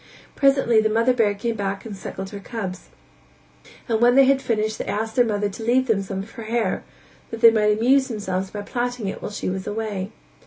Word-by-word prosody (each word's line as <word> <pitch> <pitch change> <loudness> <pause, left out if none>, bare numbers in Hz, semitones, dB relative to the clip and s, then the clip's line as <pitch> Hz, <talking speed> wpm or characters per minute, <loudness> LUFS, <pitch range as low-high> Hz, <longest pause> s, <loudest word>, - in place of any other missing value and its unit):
Presently 270 -5 +4
the 220 - +1
mother 230 +3 +3
bear 215 -4 +2
came 230 +3 -2
back 200 0 -3
and 215 -3 -6
suckled 190 0 -7
her 205 - -7
cubs, 195 -4 -6 1.0
and 225 -1 0
when 245 +1 +5
they 275 - +8
had 270 0 +3
finished 220 -3 -1
they - - -3
asked 220 +2 -3
their 245 - +5
mother 205 -3 0
to 205 +3 -8
leave 250 +3 +3
them 220 -5 +1
some 195 0 -4
of 220 - -14
her 230 -3 -9
hair 220 -3 -1 0.5
that 230 - -7
they 230 -1 +9
might 210 -1 +2
amuse 265 +4 +3
themselves 190 -5 -3
by 205 0 -6
plaiting 245 -1 -3
it - - -5
while - - -4
she 205 - -5
was 190 0 -3
away. 210 -2 -3
220 Hz, 220 wpm, -23 LUFS, 205-240 Hz, 1.0 s, they